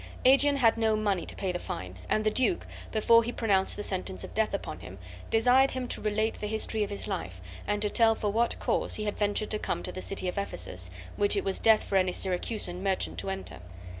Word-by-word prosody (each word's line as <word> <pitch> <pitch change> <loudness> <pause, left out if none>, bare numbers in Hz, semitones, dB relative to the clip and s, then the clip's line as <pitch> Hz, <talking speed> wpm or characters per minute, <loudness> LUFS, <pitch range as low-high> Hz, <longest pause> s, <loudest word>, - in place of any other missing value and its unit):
Aegeon 280 +2 +6
had 230 -4 +4
no 220 -1 +3
money 205 -5 0
to - - -7
pay 190 -2 -2
the 175 - -3
fine, 90 - -6
and 215 - +2
the 215 - +2
duke, 260 - +1 0.3
before 230 +2 +5
he 235 - -3
pronounced 200 -6 +1
the 205 - -4
sentence 180 - -3
of - - -8
death - - +1
upon - - -4
him, 95 - -10 0.3
desired 250 +4 +5
him 255 -1 -3
to - - 0
relate 215 +1 0
the 210 - -3
history 220 0 -1
of 205 - -3
his 200 - -3
life, 130 - -4 0.3
and 205 0 0
to 210 - +1
tell 225 -2 +4
for 210 -2 -1
what 230 +3 +1
cause - - 0
he 215 - -2
had 210 -1 -2
ventured 205 +1 0
to 215 - -1
come - - -2
to - - -4
the 185 - -6
city 195 -1 -3
of 180 - -2
Ephesus, 90 - -5 0.3
which 205 0 +2
it 200 - 0
was 195 -1 +1
death 220 -1 +5
for 195 - 0
any 185 -1 +2
Syracusan 185 0 -2
merchant 185 - -1
to 95 +2 -4
enter. 90 -3 -6
205 Hz, 235 wpm, -29 LUFS, 185-225 Hz, 0.3 s, Aegeon